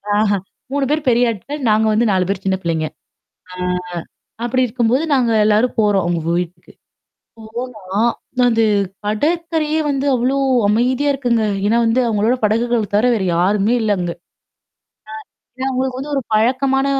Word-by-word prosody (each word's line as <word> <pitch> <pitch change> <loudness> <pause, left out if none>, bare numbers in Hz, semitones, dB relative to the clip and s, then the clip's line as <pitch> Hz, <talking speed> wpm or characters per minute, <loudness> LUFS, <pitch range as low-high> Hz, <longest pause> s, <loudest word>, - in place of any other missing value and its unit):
ஆஹ 205 -1 +2 0.3
3 280 0 0
பேர் 310 +1 +1
பெரிய 240 0 +3
ஆட்கள். 280 +8 -7
நாங்க 215 +1 +3
வந்து 225 +3 +2
4 185 -1 +2
பேர் 195 -1 -2
சின்ன 190 0 +2
பிள்ளைங்க. 160 -2 -1 0.7
ஆ, - - -9 0.9
அப்டி 255 +2 +1
இருக்கும்போது 245 +3 +1
நாங்க 245 -3 +2
எல்லாரும் 215 +4 +2
போறோம், 205 -3 +2
அவங்க 175 -1 -1 0.2
வீட்டுக்கு. 175 -1 -6 0.9
போனா, 245 -3 -5 0.7
அது 225 -1 +2 0.4
கடற்கறையே 315 +7 0
வந்து 275 -1 -1
அவ்ளோ 255 +3 0 0.3
அமைதியா 250 +6 +2
இருக்குங்க. 245 -4 0 0.2
ஏன்னா 230 - +3
வந்து 230 +3 +2
அவங்களோட 225 +2 +1
படகுகள் 225 0 +1
தவர 215 +5 +3
வேற 205 - -1
யாருமே 200 +5 +2
இல்ல 210 -2 +1
அங்க. 175 -1 -2 1.4
அ - - -34
இது 260 - -2
அவங்களுக்கு 260 0 -2
வந்து 290 +3 -5
ஒரு 275 - 0
பழக்கமான 265 +4 +2
235 Hz, 145 wpm, -18 LUFS, 210-260 Hz, 1.4 s, பெரிய